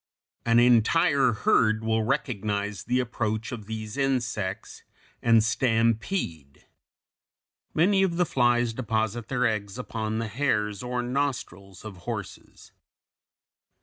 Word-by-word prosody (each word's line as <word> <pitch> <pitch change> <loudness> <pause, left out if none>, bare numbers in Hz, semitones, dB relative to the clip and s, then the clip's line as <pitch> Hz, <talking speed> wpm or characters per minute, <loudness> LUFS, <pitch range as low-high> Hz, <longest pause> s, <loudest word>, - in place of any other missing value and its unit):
An 115 0 +4
entire 125 +3 +4
herd 110 +1 +2
will 110 0 +1
recognize 105 -3 -2
the 125 +1 +1
approach 110 -3 -2
of 110 -5 -7
these 110 +1 -6
insects 115 -8 -2 0.4
and 115 -2 +5
stampede. 115 - -1 1.1
Many 190 +4 +4
of 180 -3 +1
the 180 - +3
flies 120 -4 +2
deposit 110 -1 -2
their 125 -1 0
eggs 105 -3 -2
upon 110 -3 -3
the 115 0 -2
hairs 105 -4 -1
or 125 0 -2
nostrils 120 -8 -3
of 105 -3 -8
horses. 90 - -8
115 Hz, 115 wpm, -26 LUFS, 105-125 Hz, 1.1 s, and